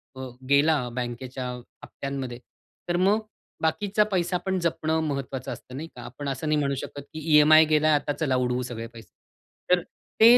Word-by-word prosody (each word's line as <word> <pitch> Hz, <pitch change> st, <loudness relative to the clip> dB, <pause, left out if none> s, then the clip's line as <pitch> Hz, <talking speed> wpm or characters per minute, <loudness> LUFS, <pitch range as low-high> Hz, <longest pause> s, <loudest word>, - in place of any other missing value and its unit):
अ, 130 Hz, -1 st, -6 dB, 0.2 s
गेला 145 Hz, +3 st, +5 dB, 0.2 s
बँकेच्या 125 Hz, +1 st, -4 dB, 0.4 s
हप्त्यांमध्ये 135 Hz, -3 st, -5 dB, 0.5 s
तर 175 Hz, -, +2 dB
मग 200 Hz, +4 st, +4 dB, 0.4 s
बाकीचा 205 Hz, +6 st, +2 dB
पैसा 180 Hz, -1 st, +1 dB
पण 190 Hz, -1 st, +1 dB
जपणं 160 Hz, -1 st, 0 dB
महत्त्वाचं 135 Hz, -2 st, -3 dB
असतं, 125 Hz, -, -9 dB
नाही 155 Hz, +4 st, -5 dB
का? 120 Hz, -, -9 dB
आपण 140 Hz, +4 st, -6 dB
असं 135 Hz, +4 st, -3 dB
नाही 150 Hz, 0 st, +2 dB
म्हणू 140 Hz, -1 st, 0 dB
शकत, 140 Hz, +2 st, -6 dB
की 155 Hz, -, -5 dB, 0.2 s
ईएमआय 155 Hz, +1 st, +8 dB
गेला 155 Hz, 0 st, +3 dB
आता 145 Hz, 0 st, 0 dB
चला 140 Hz, -5 st, 0 dB
उडवू 125 Hz, 0 st, +1 dB
सगळे 115 Hz, -1 st, -5 dB
पैसे. 115 Hz, -1 st, -14 dB, 0.6 s
तर 180 Hz, -1 st, +5 dB, 0.4 s
ते 235 Hz, +2 st, +10 dB
145 Hz, 170 wpm, -26 LUFS, 130-160 Hz, 0.6 s, ते